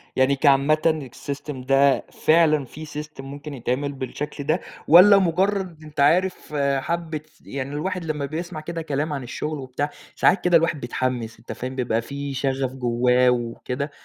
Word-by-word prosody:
يعني 130 Hz, +1 st, +3 dB
كعامةً 145 Hz, +1 st, +3 dB
الsystem 145 Hz, +1 st, -5 dB
ده 135 Hz, 0 st, +4 dB
فعلًا 155 Hz, -3 st, +3 dB
في 155 Hz, +5 st, -9 dB
system 150 Hz, 0 st, -8 dB
ممكن 145 Hz, +2 st, -8 dB
يتعمل 130 Hz, +2 st, -2 dB
بالشكل 145 Hz, +2 st, -5 dB
ده؟ 155 Hz, +5 st, +1 dB, 0.3 s
والّا 185 Hz, +5 st, +9 dB
مُجرّد 185 Hz, -2 st, 0 dB
أنت 150 Hz, -1 st, -10 dB
عارف 170 Hz, +4 st, +2 dB, 0.2 s
حبّة 160 Hz, +2 st, -3 dB, 0.2 s
يعني 140 Hz, 0 st, -5 dB
الواحد 180 Hz, +3 st, -3 dB
لمّا 150 Hz, -3 st, -2 dB
بيسمع 165 Hz, +3 st, -5 dB
كده 165 Hz, +1 st, -5 dB
كلام 150 Hz, 0 st, -2 dB
عن 140 Hz, -2 st, -4 dB
الشغل 150 Hz, +5 st, -4 dB
وبتاع، 135 Hz, +2 st, -3 dB, 0.3 s
ساعات 195 Hz, -, +3 dB
كده 175 Hz, -1 st, +6 dB
الواحد 165 Hz, -2 st, 0 dB
بيتحمّس 120 Hz, -2 st, -3 dB
أنت -, -, -9 dB
فاهم؟ 130 Hz, +1 st, -5 dB
بيبقى 120 Hz, -3 st, 0 dB
في 140 Hz, +3 st, -5 dB
شغف 135 Hz, -1 st, -1 dB
جوّاه 125 Hz, 0 st, +3 dB
وكده. 125 Hz, +3 st, -2 dB
145 Hz, 155 wpm, -23 LUFS, 130-160 Hz, 0.3 s, والّا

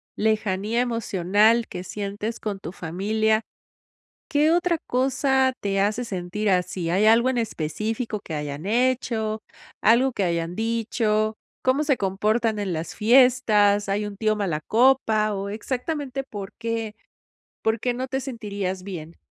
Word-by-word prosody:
lejanía 215 Hz, +1 st, 0 dB
emocional 225 Hz, -1 st, +2 dB
que 180 Hz, -, -6 dB
sientes 205 Hz, +3 st, -4 dB
con 205 Hz, -3 st, -4 dB
tu 175 Hz, -, -7 dB
familia, 215 Hz, +6 st, 0 dB, 0.9 s
¿qué 295 Hz, +2 st, +3 dB
otra 345 Hz, 0 st, +2 dB
cosa 265 Hz, 0 st, +2 dB
te 195 Hz, -1 st, 0 dB
hace 215 Hz, +5 st, +1 dB
sentir 200 Hz, +1 st, -2 dB
así? 180 Hz, -2 st, 0 dB
¿Hay 200 Hz, +4 st, +3 dB
algo 235 Hz, +3 st, +5 dB
en 255 Hz, -, -1 dB
específico 215 Hz, -, -3 dB
que 160 Hz, -, -7 dB
hayan 150 Hz, +2 st, -4 dB
hecho, 225 Hz, -2 st, 0 dB, 0.4 s
algo 245 Hz, +4 st, +4 dB
que 200 Hz, -, -1 dB
hayan 170 Hz, 0 st, -1 dB
dicho? 220 Hz, -1 st, 0 dB, 0.3 s
¿Cómo 265 Hz, +4 st, +2 dB
se 280 Hz, -3 st, +2 dB
comportan 215 Hz, +3 st, 0 dB
en 200 Hz, -3 st, -2 dB
las 160 Hz, +1 st, -4 dB
fiestas? 215 Hz, -4 st, +4 dB
¿Hay 205 Hz, +2 st, 0 dB
un 205 Hz, -, -7 dB
tío 215 Hz, -1 st, +1 dB
malacopa? 215 Hz, -, +2 dB
¿O 200 Hz, +1 st, -3 dB
exactamente 265 Hz, +5 st, -3 dB
por 205 Hz, -7 st, -8 dB
qué 230 Hz, -2 st, -3 dB, 0.7 s
por 220 Hz, +1 st, +1 dB
qué 245 Hz, -, 0 dB
no 255 Hz, +2 st, -3 dB
te 265 Hz, +1 st, -2 dB
sentirías 205 Hz, -7 st, -4 dB
bien? 170 Hz, -4 st, -8 dB
215 Hz, 140 wpm, -24 LUFS, 195-240 Hz, 0.9 s, algo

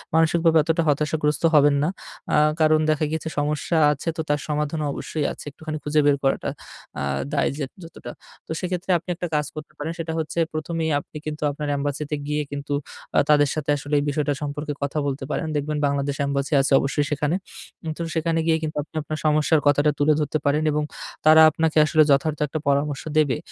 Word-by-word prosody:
মানসিকভাবে 165 Hz, 0 st, +4 dB
এতটা 165 Hz, +2 st, +1 dB
হতাশাগ্রস্ত 150 Hz, 0 st, 0 dB
হবেন 145 Hz, -1 st, +6 dB
না। 155 Hz, -, +1 dB, 0.4 s
আ -, -, +5 dB, 0.2 s
কারণ 155 Hz, 0 st, +5 dB
দেখা 155 Hz, 0 st, +2 dB
গেছে 160 Hz, 0 st, -3 dB
সমস্যা 150 Hz, +3 st, 0 dB
আছে, 150 Hz, +3 st, -5 dB
তো -, -, 0 dB
তার 145 Hz, 0 st, +2 dB
সমাধানও 150 Hz, +1 st, -1 dB
অবশ্যই 155 Hz, -3 st, -3 dB
আছে, -, -, -10 dB
একটুখানি 155 Hz, +2 st, -6 dB
খুঁজে 150 Hz, +1 st, +1 dB
বের 145 Hz, -1 st, +5 dB
করাটা 135 Hz, -, +1 dB, 0.5 s
আ -, -, -1 dB, 0.3 s
দায় -, -, +2 dB
যে 150 Hz, -, -2 dB, 0.2 s
যতটা। 165 Hz, -, -9 dB, 0.4 s
তো -, -, -8 dB
সেক্ষেত্রে 180 Hz, +1 st, -2 dB
আপনি 170 Hz, -, -11 dB
একটা 175 Hz, -, -4 dB
কাজ 150 Hz, 0 st, +1 dB
করতে 155 Hz, 0 st, -8 dB
পারেন, 155 Hz, +2 st, -3 dB
সেটা 165 Hz, 0 st, -3 dB
হচ্ছে 160 Hz, +1 st, -3 dB
প্রথমেই 160 Hz, +1 st, -2 dB
আপনি -, -, -16 dB, 0.2 s
কিন্তু 150 Hz, 0 st, -4 dB
আপনার 150 Hz, +1 st, -5 dB
এম্বাসিতে 145 Hz, +1 st, -2 dB
গিয়ে 150 Hz, 0 st, 0 dB
কিন্তু 145 Hz, 0 st, -4 dB, 0.4 s
আ -, -, +7 dB
তাদের 145 Hz, -1 st, +5 dB
সাথে 155 Hz, -2 st, -4 dB
আসলে 145 Hz, +1 st, -7 dB
এই -, -, -1 dB
বিষয়টা 145 Hz, 0 st, 0 dB
সম্পর্কে 145 Hz, +1 st, -4 dB
কথা 140 Hz, +2 st, -2 dB
বলতে 135 Hz, 0 st, -3 dB
পারেন। 160 Hz, -, -2 dB
দেখবেন 150 Hz, +1 st, -1 dB
বাংলাদেশ 140 Hz, 0 st, 0 dB
এম্বাসি 140 Hz, +2 st, -1 dB
আছে 135 Hz, -, -1 dB
অবশ্যই 140 Hz, +1 st, 0 dB
সেখানে। 150 Hz, +3 st, 0 dB, 0.6 s
তো -, -, -5 dB
সেখানে 165 Hz, 0 st, +1 dB
গিয়ে 160 Hz, -1 st, +4 dB
কিন্তু 155 Hz, -1 st, -4 dB
আপনি 155 Hz, -, -23 dB
আপনার 155 Hz, +1 st, -5 dB
সমস্যার 155 Hz, +1 st, +3 dB
কথাটা 145 Hz, +1 st, +4 dB
তুলে 150 Hz, +1 st, +4 dB
ধরতে 150 Hz, 0 st, 0 dB
পারেন 145 Hz, +2 st, +2 dB
এবং 150 Hz, 0 st, 0 dB, 0.4 s
তারা 155 Hz, +1 st, +8 dB
আপনাকে 160 Hz, 0 st, 0 dB
আসলে 155 Hz, 0 st, +4 dB
যথার্থ 145 Hz, +2 st, +2 dB
একটা 155 Hz, +2 st, -4 dB
পরামর্শ 140 Hz, 0 st, +1 dB
দেবে। 150 Hz, -4 st, +3 dB
150 Hz, 190 wpm, -23 LUFS, 145-155 Hz, 0.6 s, তারা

